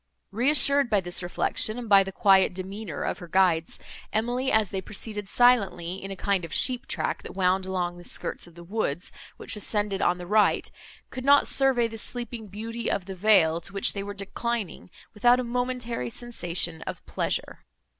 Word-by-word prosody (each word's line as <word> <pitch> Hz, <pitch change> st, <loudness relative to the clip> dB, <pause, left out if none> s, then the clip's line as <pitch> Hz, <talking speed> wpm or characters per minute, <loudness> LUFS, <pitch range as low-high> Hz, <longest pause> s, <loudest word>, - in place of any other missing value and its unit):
Reassured 280 Hz, +3 st, +4 dB
by 210 Hz, -3 st, +3 dB
this 175 Hz, -1 st, -2 dB
reflection, 200 Hz, +5 st, 0 dB
and 245 Hz, -2 st, -6 dB
by 200 Hz, -2 st, +6 dB
the 195 Hz, -, -6 dB
quiet 190 Hz, -2 st, +4 dB
demeanour 190 Hz, -2 st, -6 dB
of -, -, -3 dB
her 175 Hz, -, -9 dB
guides, 170 Hz, -2 st, +1 dB, 0.3 s
Emily, 245 Hz, +4 st, -1 dB
as 220 Hz, -3 st, +2 dB
they 190 Hz, -2 st, -2 dB
proceeded 205 Hz, +1 st, -4 dB
silently, 195 Hz, -7 st, +2 dB
in 195 Hz, -, -6 dB
a 195 Hz, -, -5 dB
kind 195 Hz, -1 st, 0 dB
of 165 Hz, -, -7 dB
sheep 255 Hz, 0 st, +1 dB
track, -, -, -2 dB
that -, -, -10 dB
wound 190 Hz, 0 st, +1 dB
along 175 Hz, -2 st, -2 dB
the -, -, -12 dB
skirts -, -, -2 dB
of 170 Hz, -, -17 dB
the 170 Hz, -, -11 dB
woods, 180 Hz, -3 st, -3 dB, 0.3 s
which -, -, -6 dB
ascended 205 Hz, -1 st, -1 dB
on 175 Hz, -, +2 dB
the 180 Hz, -, -8 dB
right, 210 Hz, +3 st, +2 dB, 0.4 s
could 255 Hz, -, -6 dB
not 285 Hz, +1 st, +5 dB
survey 265 Hz, -4 st, +3 dB
the 225 Hz, 0 st, -8 dB
sleeping 240 Hz, -1 st, -2 dB
beauty 225 Hz, +4 st, -5 dB
of 190 Hz, -, -2 dB
the 195 Hz, -, -6 dB
vale, 175 Hz, -5 st, +4 dB
to 195 Hz, -, -8 dB
which 195 Hz, -, +1 dB
they 200 Hz, -, -4 dB
were 200 Hz, 0 st, -6 dB
declining, 205 Hz, 0 st, -4 dB, 0.2 s
without 240 Hz, +3 st, +4 dB
a -, -, -1 dB
momentary 245 Hz, -, -3 dB
sensation 175 Hz, -, -2 dB
of -, -, -7 dB
pleasure. -, -, -3 dB
200 Hz, 185 wpm, -26 LUFS, 185-235 Hz, 0.4 s, by